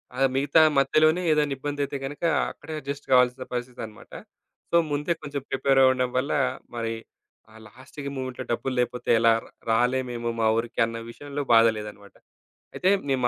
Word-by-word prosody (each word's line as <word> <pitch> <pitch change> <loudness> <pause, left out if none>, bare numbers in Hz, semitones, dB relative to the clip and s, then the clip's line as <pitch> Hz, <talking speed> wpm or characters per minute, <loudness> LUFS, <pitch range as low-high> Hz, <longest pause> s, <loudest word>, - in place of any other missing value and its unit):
ఆ - - -5 0.2
మిగతా 140 +4 +4 0.2
మధ్యలోనే 155 +5 +3
ఏదైనా 150 -2 +2
ఇబ్బంది 145 +1 -4
అయితే 140 - -5
గనుక, 145 +4 -7 0.3
అక్కడే 160 - -10
అడ్జస్ట్ 140 0 -7
గావాల్సిన 125 0 +3
పరిస్థితన్నమాట. 120 -3 -7
అడ్జస్ట్, 170 -1 -3
ముందే 145 +4 0
కొంచెం 145 -2 -5
ప్రిపేర్ 135 0 +2
అవ్వడం 130 -1 +3
వల్ల, 135 +3 0 0.4
మరి 115 -1 -2 0.6
ఆ - - -18
లాస్ట్‌కి 135 +4 -9
మొవ్‌మెంట్‌లో 130 -1 -5
డబ్బులు 130 +2 -3
లేకపోతే 125 0 -2
ఎలా 115 0 +5
రా - - -17 0.2
రాలేమేమో 120 0 0
మా 110 - +3
ఊరికి 115 +1 -3
అన్న 115 0 -6
విషయంలో 145 +3 -6
బాధ 115 0 +7
లేదన్నమాట. 105 -1 -10 0.6
అయితే 185 - +1 0.2
మేము 130 -2 +2
130 Hz, 155 wpm, -25 LUFS, 120-145 Hz, 0.6 s, బాధ